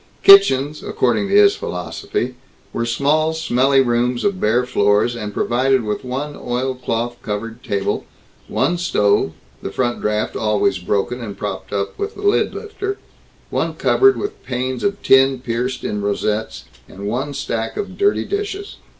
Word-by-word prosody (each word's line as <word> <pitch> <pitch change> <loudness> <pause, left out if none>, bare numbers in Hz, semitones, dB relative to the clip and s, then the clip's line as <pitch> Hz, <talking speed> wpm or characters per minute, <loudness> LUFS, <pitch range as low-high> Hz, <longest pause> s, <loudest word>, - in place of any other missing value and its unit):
Kitchens, 155 -7 +6
according 125 - 0
to 200 - +1
his 205 -1 +6
philosophy, 90 +7 -4 0.4
were 115 0 -1
small 150 +6 +1
smelly 135 -3 +2
rooms 120 0 0
of 200 -2 0
bare 120 +4 +2
floors, 105 0 +2
and 105 -3 -5
provided 130 +4 +1
with 105 +4 -3
one 135 +4 -4
oilcloth 120 -1 -3
covered 115 +3 -5
table, 100 -1 -2 0.4
one 175 0 0
stove 105 - +2 0.3
(the - - -4
front 120 +2 -1
draft 105 0 -1
always 105 -3 +1
broken 105 +7 -1
and 105 -4 -7
propped - - -5
up 100 -1 -3
with 410 +1 -3
the 405 - -9
lid 405 0 +2
lifter), 405 -2 -5 0.5
one - - -1
cupboard 400 0 +4
with 410 +1 -5
panes 125 0 -3
of 200 0 -1
tin 135 0 +5
pierced 125 +1 -3
in 105 - -2
rosettes, 105 +2 -2 0.3
and 100 +1 -9
one 125 +7 -2
stack 115 -4 -3
of 200 -2 -4
dirty 405 +1 +1
dishes. 405 0 -4
125 Hz, 150 wpm, -19 LUFS, 110-155 Hz, 0.5 s, Kitchens